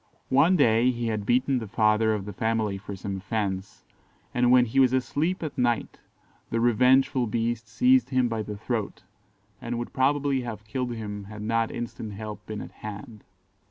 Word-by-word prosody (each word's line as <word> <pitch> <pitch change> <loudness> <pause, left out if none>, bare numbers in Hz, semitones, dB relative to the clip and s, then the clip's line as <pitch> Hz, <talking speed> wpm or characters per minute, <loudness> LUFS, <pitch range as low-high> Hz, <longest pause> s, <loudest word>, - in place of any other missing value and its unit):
"One 155 +8 +5
day 120 -5 +4
he 120 -2 -1
had 105 -2 -3
beaten 130 +2 +2
the 110 - -6
father 110 +1 +2
of 100 -2 -5
the 105 - -6
family 110 -1 -1
for 100 0 -7
some 95 +1 -5
offence, 95 -1 -4 0.5
and 125 0 +3
when 125 0 +6
he 125 +4 0
was 130 -1 +5
asleep 155 +8 0
at 155 - -4
night, 120 -2 0 0.5
the 115 - 0
revengeful 125 +2 +3
beast 115 +1 -2
seized 255 - +3
him 130 -2 +2
by 115 -2 -2
the 105 -1 -6
throat, 110 0 -3 0.6
and 120 0 -3
would 120 - -5
probably 140 0 +1
have 110 -3 -7
killed 120 +2 -3
him 105 -2 -6
had 105 +1 -8
not 115 +1 +1
instant 115 -2 -6
help 105 0 -7
been 105 -1 -5
at - - -9
hand. 105 0 -9
115 Hz, 180 wpm, -26 LUFS, 105-125 Hz, 0.6 s, when